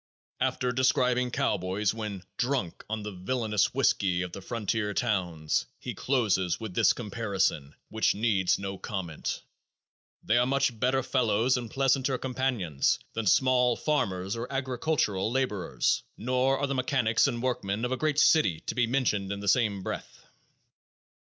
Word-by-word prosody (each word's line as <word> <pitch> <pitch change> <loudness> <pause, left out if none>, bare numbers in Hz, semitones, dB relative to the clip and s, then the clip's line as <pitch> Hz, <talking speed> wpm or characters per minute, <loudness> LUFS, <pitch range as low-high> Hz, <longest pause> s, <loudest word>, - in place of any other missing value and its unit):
After 125 0 0
describing 125 0 +2
cowboys 100 -2 0
when 105 -4 -5
"drunk 125 -8 -1
on 110 -1 -3
the 105 - -5
villainous 105 +2 0
whiskey 90 -2 +1
of 90 - -6
the 100 - -8
frontier 105 -1 -2
towns," 90 -9 0
he - - -6
closes 95 -10 +1
with 110 -4 -6
this - - +4
comparison, 100 - -2
which 110 0 +1
needs 100 -4 +2
no 95 -1 -5
comment: 95 -8 -4 0.8
"They 115 +3 +3
are 125 - +2
much 135 -4 +1
better 130 +2 +2
fellows 120 -1 +2
and 120 -3 -4
pleasanter 135 0 +1
companions 125 - 0 0.2
than 115 -2 -2
small 125 +2 +4
farmers 95 -11 -1
or 120 +3 -5
agricultural 130 -6 0
laborers; 105 - 0 0.2
nor 130 +3 +1
are 140 - 0
the 140 - -2
mechanics 130 -3 +2
and 120 -4 -2
workmen 115 -3 -1
of 125 - -3
a 130 - 0
great 155 0 0
city 125 - +4
to - - -4
be 120 -2 +1
mentioned 110 -6 0
in 100 - -3
the 100 - -6
same 100 -3 +2
breath." - - -6
115 Hz, 150 wpm, -28 LUFS, 100-130 Hz, 0.8 s, this